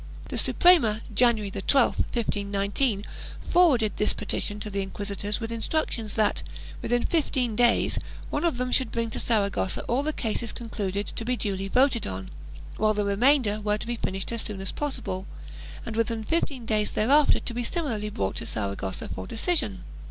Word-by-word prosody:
The - - -3
Suprema, 240 -12 +4
January 215 -2 +3
12, 245 +6 +2
1519, 205 0 0 0.4
forwarded 260 - +4
this 210 - +3
petition 205 0 -3
to 210 0 -5
the 195 0 -1
inquisi 200 +1 -4
tors 205 +1 -1
with 225 -1 -4
instructions 230 -2 -1
that, 215 -2 +2 0.4
within 245 0 +1
fifteen 260 -8 +1
days, 240 +1 +3 0.3
one 295 - -1
of 335 -7 +1
them 250 0 -2
should 260 - +2
bring 230 -1 -1
to - - -3
Saragossa 200 -4 0
all 245 +4 0
the 305 +2 0
cases 230 -3 -2
concluded, 205 -3 -3
to - - -4
be 250 +2 -1
duly 195 -3 -2
voted 250 +1 +2
on, 95 0 -6 0.5
while 215 0 +2
the 205 0 0
remainder 215 +1 +3
were 210 0 +1
to - - -4
be 240 +1 -2
finished 195 -3 -3
as 230 -1 -1
soon 205 -3 -4
as 195 -1 -3
possible 195 -10 -3 0.6
and 220 - -5
within 225 0 0
fifteen 280 -3 -1
days 215 -2 +1
thereafter 280 +7 +4
to 235 - -4
be 240 +1 -2
similarly 230 - -2
brought 95 - -2
to - - -5
Saragossa 100 -2 -3
for 95 0 -6
decision. 220 - 0
220 Hz, 175 wpm, -26 LUFS, 200-245 Hz, 0.6 s, Suprema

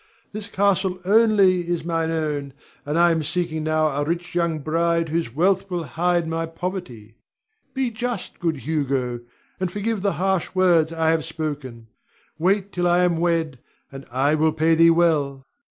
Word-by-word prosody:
This 210 -1 -6
castle 195 -2 +1
only 200 -4 +4
is 170 -2 -2
mine 165 -1 -1
own, 150 -4 -2 0.3
and 150 +2 -1
I 170 0 +5
am 165 -1 +1
seeking 160 0 -2
now 155 0 +1
a 145 0 -1
rich 170 +3 -3
young 170 -2 0
bride 165 +2 0
whose 165 -6 -1
wealth 190 +4 +2
will 175 -2 -2
hide 175 +2 0
my 165 0 -2
poverty. 165 - -6 0.6
Be 265 -2 0
just, 240 -2 -5
good 160 -5 -1
Hugo, 135 -5 -1 0.4
and 185 -2 -2
forgive 205 +1 -2
the 200 0 +1
harsh 190 -1 -1
words 170 -4 +3
I 160 -1 +1
have 160 -1 0
spoken. 145 -8 -5 0.5
Wait 195 +3 +1
till 175 -1 0
I 175 +1 +3
am 175 -2 +2
wed, 165 -5 0 0.3
and 135 -1 -10
I 135 +4 +1
will 155 0 +2
pay 160 +1 +2
thee 165 +1 +6
well. 150 -5 +1
165 Hz, 170 wpm, -23 LUFS, 155-180 Hz, 0.6 s, thee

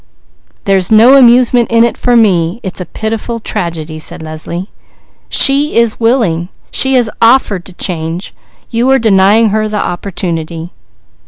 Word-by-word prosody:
"There's 195 -1 +1
no 225 +4 +6
amusement 245 -2 +4
in 230 0 +3
it 235 - 0
for 245 -1 0
me, 190 -4 +1
it 190 -1 -5
is 180 - -7
pitiful 225 +1 -4
tragedy," 165 -7 -5
said 155 - -5
Leslie. 160 +4 -7 0.6
"She 280 +2 +3
is 230 -2 +1
willing, 220 -8 0 0.2
she 265 0 +1
has 245 -3 +2
offered 225 -6 +2
to 185 - -13
change, 170 0 -5 0.4
you 240 +2 0
are 270 - +4
denying 215 0 +3
her 215 +1 -1
the 210 - -3
opportunity." 170 -3 -5
210 Hz, 145 wpm, -11 LUFS, 175-235 Hz, 0.6 s, no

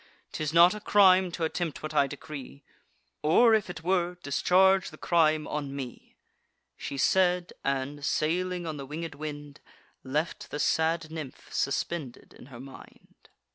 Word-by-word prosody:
'Tis 155 -1 -3
not 170 +3 +6
a 210 - -6
crime 190 -3 +5
t' 170 - -4
attempt 160 -1 -3
what 155 0 -5
I 140 -2 +3
decree; 140 -1 -9 0.6
Or, 225 +10 +5
if 215 -4 +1
it 175 - -8
were, 180 0 0
discharge 190 +6 +3
the - - -13
crime 155 -3 +2
on 140 -2 -4
me." 130 -4 -8 0.6
She 140 - -6
said, 180 +3 +2
and, 140 +1 -2
sailing 175 +4 -1
on 155 -2 -4
the 140 -1 -7
winged 160 +2 -6
wind, 145 -1 -8 0.4
Left 150 +5 -3
the - - -5
sad 160 +1 0
nymph 155 -5 -8
suspended 140 -1 -3
in - - -15
her 125 -4 -12
mind. 135 +1 -15
155 Hz, 150 wpm, -28 LUFS, 145-180 Hz, 0.6 s, not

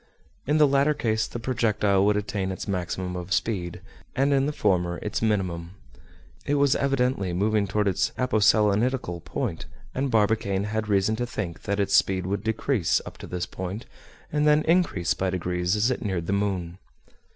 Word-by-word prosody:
In 150 +2 +3
the 150 - +6
latter 140 +2 +3
case, 110 -5 0
the - - -6
projectile 105 -5 +1
would 105 0 +3
attain 105 -3 -2
its 95 - -6
maximum 90 -1 -3
of 90 +1 -6
speed; 90 -3 -1 0.3
and 140 +2 +2
in 135 0 +2
the - - 0
former 90 -9 0
its 105 - -2
minimum. 95 -5 -1 0.7
It 145 - 0
was 140 -1 +3
evidently 125 -9 0
moving 105 +2 +1
toward 105 +1 0
its 95 -1 +1
aposelenitical 110 -4 +2
point; - - -4 0.3
and 135 +1 -1
Barbicane 105 -3 +1
had 110 +1 -2
reason 100 +2 +2
to 120 +1 -2
think 95 -8 -5
that 100 -1 -1
its 100 0 0
speed 95 -1 +2
would 100 +1 -2
decrease 110 -3 +1
up - - -10
to - - -8
this 90 -1 -3
point, 95 +5 -6 0.5
and 150 0 +2
then 150 0 +4
increase 160 - +2
by 95 0 -1
degrees 90 0 -1
as 110 +4 +2
it 125 - -2
neared 95 -5 -2
the 95 - -1
moon. 95 -3 -2
105 Hz, 175 wpm, -25 LUFS, 95-120 Hz, 0.7 s, the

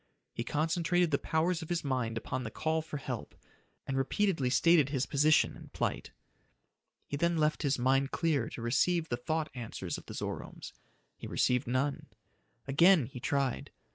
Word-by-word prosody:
He 115 - -3
concentrated 165 +4 +1
the 140 - +2
powers 165 +2 0
of 160 - -8
his 175 -2 -1
mind 125 -5 -1
upon 130 +3 -3
the 110 - -4
call 160 +7 -1
for 155 -1 -6
help, 125 - -6 0.5
and 135 - -3
repeatedly 140 +1 +1
stated 150 +2 +4
his 135 -2 0
position 150 +2 +3
and - - -13
plight. - - -2 1.0
He 145 - -4
then 170 +2 +1
left 155 -1 +1
his 140 -2 +1
mind 135 +2 +2
clear 160 -4 0
to 115 - -7
receive 165 +8 +1
the 120 - 0
thought 155 +4 -2
answers 120 -3 -5
of - - -18
the - - -7
Zoromes. - - -6 0.4
He - - -8
received 125 +1 +1
none. 130 +3 -1 0.6
Again 170 +2 +5
he 125 +2 -9
tried. 140 -1 -1
145 Hz, 170 wpm, -31 LUFS, 130-160 Hz, 1.0 s, Again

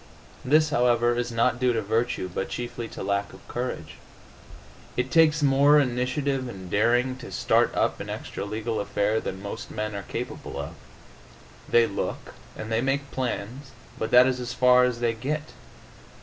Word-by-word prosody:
This, 155 +3 +3
however, 120 -1 +3
is 120 0 -2
not 115 +1 +1
due 125 -1 +2
to 115 - 0
virtue, 110 -2 0
but 90 +2 -4
chiefly 120 -1 -5
to - - -7
lack 100 +1 -1
of - - -15
courage. 120 -11 -5 1.0
It 125 +1 -1
takes 155 -2 +4
more 140 +2 +6
initiative 130 +1 0
and 95 -6 -9
daring 120 +5 +2
to 130 - -10
start - - +2
up - - +1
an - - -6
extra - - -5
legal 110 +2 -3
affair 105 +2 0
than 95 -2 -6
most 105 +3 -6
men 105 0 -4
are 100 - -4
capable 95 - -6
of. - - -5 1.0
They 120 -1 +5
look 100 - -4 0.2
and 110 +1 -6
they 115 +1 +2
make 140 +2 -1
plans, 130 +2 -4 0.3
but 110 - -2
that 125 +2 +7
is 130 -1 0
as 120 -1 -4
far 125 0 +6
as 120 -1 -2
they 120 -1 +2
get. 150 +7 -4
120 Hz, 170 wpm, -26 LUFS, 110-130 Hz, 1.0 s, that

